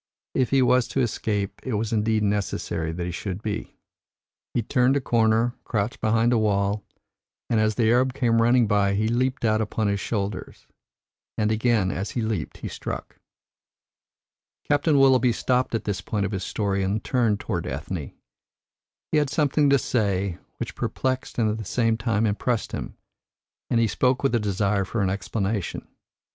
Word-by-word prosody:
If 130 - +1
he 135 -1 +4
was 125 0 +3
to - - -2
escape, 105 -4 -2
it 130 -4 -2
was 110 +1 -1
indeed 110 0 +1
necessary 95 -5 -1
that 85 +1 -4
he 90 - -3
should 95 +3 -5
be. 105 -2 -4 0.8
He 120 - +1
turned 125 +4 +2
a - - +2
corner, 115 -1 +2
crouched 105 +3 -2
behind 115 +2 +3
a 115 - +3
wall, 100 -1 +1 0.7
and 115 - +3
as 110 0 +2
the 115 0 +2
Arab 125 +2 +2
came 115 -4 +2
running 120 +1 +4
by 100 -2 +2
he 110 +2 +1
leaped 125 +2 0
out 110 0 +2
upon 110 0 -1
his 100 0 +1
shoulders. 100 -1 -4 0.7
And 110 0 +1
again 110 -4 +2
as 95 +3 -3
he 120 - 0
leaped 110 -1 -3
he - - -1
struck." - - -6 1.5
Captain 145 +1 +3
Willoughby 130 -3 +5
stopped 125 0 0
at 115 - -2
this 105 -2 -2
point 105 -2 -1
of 100 - -3
his 95 -2 -3
story 100 -1 -1
and 100 +3 -1
turned 115 -5 +1
towards 90 -7 -3
Ethne. - - -4 1.0
He 155 - +4
had 145 -2 0
something 145 -1 +2
to 140 - +5
say 100 -8 -1 0.2
which - - -5
perplexed 130 0 -2
and 115 -3 +2
at 110 +1 -1
the - - -4
same 115 +2 +1
time 110 -1 0
impressed 110 +2 -1
him, - - -6 0.7
and 115 - +2
he 115 - +4
spoke 125 +4 +1
with 135 - +2
a 120 - +3
desire 100 -1 0
for 100 +2 -2
an 95 - +1
explanation. 100 0 -3
110 Hz, 175 wpm, -25 LUFS, 100-125 Hz, 1.5 s, Willoughby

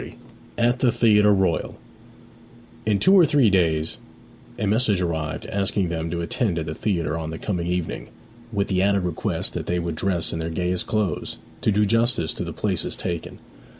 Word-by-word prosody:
XXX. - - -9 0.4
AT 120 +1 +2
THE 125 -2 +3
THEATRE 105 -3 +4
ROYAL 95 -5 +1 1.1
In 105 -2 +3
two 190 - +4
or 190 -3 +8
three 140 -8 +4
days 80 -1 +1 0.6
a 110 - -1
message 105 -1 +2
arrived 80 -4 -2
asking 95 -2 0
them 80 -1 -3
to 85 +1 -2
attend 90 +1 -1
at 80 - -2
the 75 - -4
theatre 85 -6 -1
on 80 -1 -4
the 80 - -5
coming 90 -4 -2
evening, 90 -2 -2 0.4
with 100 -2 0
the 95 -1 +2
added 100 -1 +2
request 90 -3 -2
that - - -4
they 90 - 0
would 85 -1 -2
dress 85 +1 -1
in 80 - -3
their 80 0 -3
gayest 90 +2 -2
clothes, 110 -3 -1 0.2
to - - +2
do 105 +1 +3
justice 115 -5 +1
to - - -4
the - - -5
places - - -1
taken. 85 -2 -4
95 Hz, 185 wpm, -23 LUFS, 85-105 Hz, 1.1 s, or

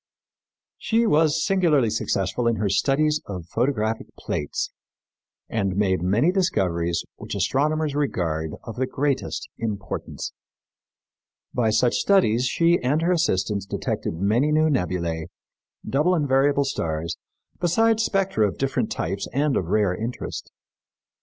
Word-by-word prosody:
She 230 +1 +2
was 155 -4 +3
singularly 165 - +3
successful 100 +6 -1
in 115 - +2
her 105 -1 -1
studies 150 +9 +2
of 90 -4 -6
photographic 115 - -1
plates 75 - -3 0.8
and 100 -4 -1
made 95 -3 +1
many 105 - +3
discoveries 85 - 0
which - - -6
astronomers 155 +2 +1
regard 80 - -1
of 115 - -8
the 130 +1 0
greatest 140 +1 -2
importance. 105 -3 -4 1.2
By 115 -3 +2
such 110 +3 +3
studies 130 - +3
she 170 +5 +3
and 145 +6 +1
her 175 - +2
assistants 100 - 0
detected - - -3
many 110 - +2
new 155 +1 +3
nebulæ, 85 - -1 0.6
double 155 +7 +2
and 150 -4 0
variable 140 +1 +3
stars, 85 - -2 0.4
besides 225 +6 +3
spectra 195 - +1
of 95 - -5
different 135 0 -1
types 95 +5 -2
and 140 +1 +1
of 90 - 0
rare 100 +1 +2
interest. 115 +5 -5
125 Hz, 125 wpm, -24 LUFS, 100-150 Hz, 1.2 s, was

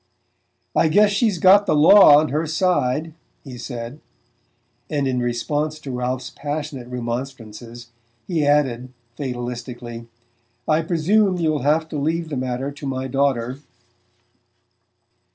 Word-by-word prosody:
"I 165 - +4
guess 205 +6 +4
she's 205 -1 +1
got 195 +4 +5
the - - +2
law 150 0 +8
on 155 +1 +2
her 155 +4 -1
side," 160 -3 0 0.3
he 130 -3 -9
said; 120 +2 -7 0.9
and 145 -3 -1
in 125 -1 0
response 145 +6 -2
to 145 -3 -8
Ralph's 125 +1 -3
passionate 145 -3 -5
remonstrances 120 -1 -7 0.3
he 165 -5 -1
added 130 -4 +1 0.2
fatalistically: 120 -2 -6 0.6
"I 155 +1 +3
presume 185 +4 +1
you'll 155 -4 0
have 155 +4 +1
to 150 - -4
leave 160 +3 -1
the 145 - -4
matter 130 +1 -3
to 145 0 -8
my 130 0 -3
daughter." 130 -1 -1
140 Hz, 125 wpm, -21 LUFS, 125-155 Hz, 0.9 s, law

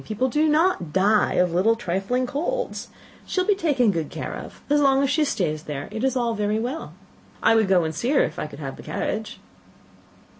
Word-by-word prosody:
People 230 +5 -1
do 305 +4 +2
not 305 - +2
die 205 +4 +3
of 180 -1 +2
little 205 +6 +3
trifling 225 +4 -1
colds. 350 - -3 0.4
She - - -1
will 365 - +2
be 415 - +5
taken 285 - +2
good 165 -5 -3
care - - -5
of. - - -9
As 290 0 +3
long 275 -1 +4
as 275 - +1
she 310 - +2
stays 155 - -1
there, 145 -1 -5
it 220 +2 -4
is 265 -1 +1
all 240 -2 0
very 210 0 0
well. 250 +8 -4 0.5
I 225 - +5
would 220 -2 +3
go 185 -2 +4
and 160 0 -2
see 205 +11 -2
her 280 - +4
if - - -4
I - - -3
could 145 - -11
have 135 -3 -6
the - - -10
carriage." 215 +1 -4
225 Hz, 220 wpm, -24 LUFS, 185-280 Hz, 0.5 s, be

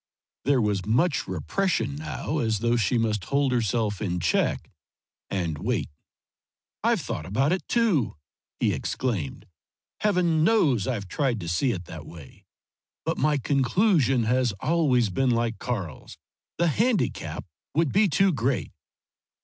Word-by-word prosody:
there 135 -4 +3
was 100 -3 0
much 135 - +1
repression 160 -10 -1
now, 155 0 -3
as 110 -4 +1
though 120 +3 +1
she 120 +1 +1
must 105 -5 0
hold 140 -1 +1
herself 110 -3 0
in 90 -4 -1
check, 85 0 0 0.6
and 85 -6 -2
wait. - - -1 0.9
"I've - - +3
thought 75 - -5
about 135 - +1
it 180 -4 -1
too!" 215 - +2 0.4
he - - +2
exclaimed. 100 - -3 0.5
"Heaven 175 -6 +2
knows 155 - +3
I've 105 -7 -2
tried 125 +3 0
to 85 - -6
see 85 +10 +1
it 90 -5 -5
that - - -9
way. 80 -6 -13 0.6
But - - -1
my 150 -1 +2
conclusion 135 - +2
has 125 0 +1
always 125 - +1
been 130 +8 +1
like 115 -1 0
Karl's: 95 -11 -5 0.4
the 170 0 +3
handicap 220 - 0 0.3
would 160 -3 +2
be 200 +2 +5
too 190 +5 +3
great." 130 0 -1
125 Hz, 140 wpm, -26 LUFS, 105-155 Hz, 0.9 s, be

